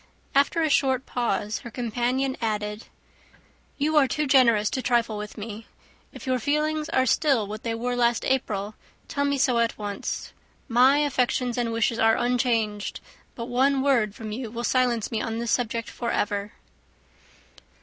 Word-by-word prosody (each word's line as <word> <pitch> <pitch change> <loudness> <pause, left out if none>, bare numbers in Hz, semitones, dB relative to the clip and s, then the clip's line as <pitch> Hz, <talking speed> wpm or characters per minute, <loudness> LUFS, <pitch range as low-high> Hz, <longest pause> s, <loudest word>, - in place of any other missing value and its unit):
After 285 +4 +3
a 315 - +2
short 265 -2 +2
pause, 220 -3 -1
her 235 - -9
companion 245 +3 -1
added, 210 -1 -3 0.9
"You 305 +2 +1
are 280 -3 +6
too 300 +3 -1
generous 235 -6 +4
to 260 - -2
trifle 235 -3 +1
with 210 0 -7
me. 215 +1 -7 0.4
If - - -11
your 255 -1 +1
feelings 300 +4 0
are 260 - +2
still 265 -3 +2
what 210 +2 -7
they 230 -1 -2
were 245 +2 -2
last 235 -1 +1
April, 215 -6 -1 0.3
tell 285 -1 -1
me 280 0 +1
so 255 -3 +2
at 230 0 0
once. 205 -1 -5 0.3
My 255 +3 +5
affections 255 -4 0
and 240 -2 -1
wishes 230 0 0
are 225 0 +4
unchanged; 230 -4 0 0.4
but 230 - -5
one 265 +2 +2
word 235 -7 +2
from 220 -2 -7
you 230 +1 -4
will 235 +2 -5
silence 245 -3 +1
me 225 - -1
on 225 0 -3
this 235 -1 -2
subject 230 -2 -1
for 235 - -4
ever." 205 -2 -1
240 Hz, 165 wpm, -25 LUFS, 220-265 Hz, 0.9 s, are